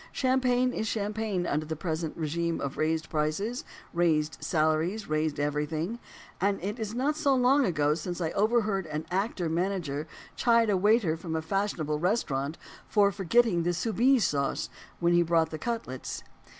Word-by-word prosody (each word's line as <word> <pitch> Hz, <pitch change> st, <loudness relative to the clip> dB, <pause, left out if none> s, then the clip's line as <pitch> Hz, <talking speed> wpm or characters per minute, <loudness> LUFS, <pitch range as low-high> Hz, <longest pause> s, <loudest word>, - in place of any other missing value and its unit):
Champagne 255 Hz, -1 st, +2 dB
is 220 Hz, -, -2 dB
champagne 210 Hz, -3 st, -1 dB
under 155 Hz, -1 st, -1 dB
the 160 Hz, -, -3 dB
present 160 Hz, -1 st, -3 dB
regime 165 Hz, +1 st, -1 dB
of 140 Hz, -1 st, -3 dB
raised 160 Hz, 0 st, 0 dB
prices, 195 Hz, -, -1 dB, 0.3 s
raised 160 Hz, -3 st, +2 dB
salaries, 160 Hz, +6 st, +1 dB
raised 155 Hz, -1 st, 0 dB
everything; 155 Hz, +8 st, -1 dB, 0.4 s
and 200 Hz, +1 st, +2 dB
it 205 Hz, +5 st, -3 dB
is 220 Hz, 0 st, -4 dB
not 280 Hz, +5 st, +1 dB
so 285 Hz, -3 st, +2 dB
long 255 Hz, -2 st, +4 dB, 0.2 s
since 175 Hz, +2 st, -5 dB
I 165 Hz, -2 st, -1 dB
overheard 210 Hz, -4 st, +1 dB
an 155 Hz, 0 st, -4 dB
actor 190 Hz, -2 st, -1 dB
manager 165 Hz, -3 st, -1 dB, 0.3 s
chide 230 Hz, -2 st, +3 dB
a -, -, +3 dB
waiter 205 Hz, -3 st, +3 dB
from 165 Hz, -1 st, -5 dB
a 160 Hz, -, 0 dB
fashionable 160 Hz, -5 st, -1 dB
restaurant, 155 Hz, -, 0 dB, 0.3 s
for 205 Hz, -2 st, +4 dB
forgetting 200 Hz, 0 st, +2 dB
the 175 Hz, +1 st, 0 dB
Soubise 235 Hz, +5 st, +3 dB
sauce, 140 Hz, -1 st, -1 dB, 0.3 s
when 170 Hz, 0 st, +3 dB
he 175 Hz, -, +5 dB
brought 165 Hz, -1 st, +2 dB
the 155 Hz, -, -5 dB
cutlets. 225 Hz, -, -4 dB
175 Hz, 155 wpm, -28 LUFS, 155-220 Hz, 0.4 s, he